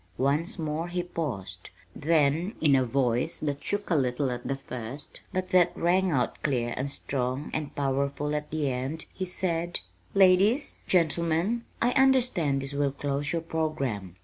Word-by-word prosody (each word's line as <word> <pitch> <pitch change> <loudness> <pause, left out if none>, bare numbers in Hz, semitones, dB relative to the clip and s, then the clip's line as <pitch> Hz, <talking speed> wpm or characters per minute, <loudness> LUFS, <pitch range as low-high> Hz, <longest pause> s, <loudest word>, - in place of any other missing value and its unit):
Once 150 - +1
more 160 0 -2
he 175 0 -2
paused. 150 - -5 0.3
Then, 160 +4 +2
in 145 -3 +5
a 130 - +4
voice 125 +3 0
that 145 -2 -3
shook 205 -2 -2
a - - +4
little 130 -1 +1
at 120 0 -5
the 135 - 0
first, 130 +1 -7
but 185 -1 -2
that 180 -1 +4
rang 185 +2 +3
out 130 -5 0
clear 120 -5 0
and 135 +2 -2
strong 135 0 -3
and 150 -2 -3
powerful 140 +1 0
at 150 0 -2
the 155 -2 -1
end, 130 +5 -3
he 185 - -3
said: 175 -2 -2 0.3
"Ladies, 195 +8 +4
gentlemen, 170 +6 +2 0.2
I 245 - +4
understand 250 - +3
this 135 +1 -5
will 140 -1 +1
close 140 +1 -2
your 165 -1 -1
programme. 140 - -2
150 Hz, 160 wpm, -28 LUFS, 135-175 Hz, 0.3 s, in